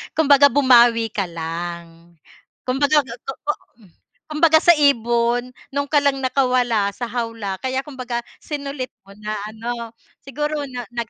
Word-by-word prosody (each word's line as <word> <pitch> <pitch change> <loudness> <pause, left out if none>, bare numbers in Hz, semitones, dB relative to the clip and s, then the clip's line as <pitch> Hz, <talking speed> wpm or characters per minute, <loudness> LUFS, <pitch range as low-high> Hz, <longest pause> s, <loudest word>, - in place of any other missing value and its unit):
Kumbaga 285 -2 +6
bumawi 240 -4 +5
ka 205 -5 -1
lang, 170 0 -7 0.5
kumbaga 285 +4 +2
totoo, 260 +5 -5 0.8
kumbaga 315 +1 +4
sa 345 - +8
ibon, 240 -2 +2 0.2
'nun 285 +1 -2
ka 295 - +4
lang 280 -1 +2
nakawala 250 -5 +1
sa 245 - -4
hawla 230 -5 -4
kaya 260 +2 -2
kumbaga 255 -4 -4 0.2
sinulit 280 -3 -5 0.2
mo 195 - -14
na, 215 0 -4
ano? 230 +1 -6 0.3
Siguro 295 +2 -3
na, 245 -2 -6
nag, 235 -2 -4
245 Hz, 130 wpm, -21 LUFS, 225-280 Hz, 0.8 s, sa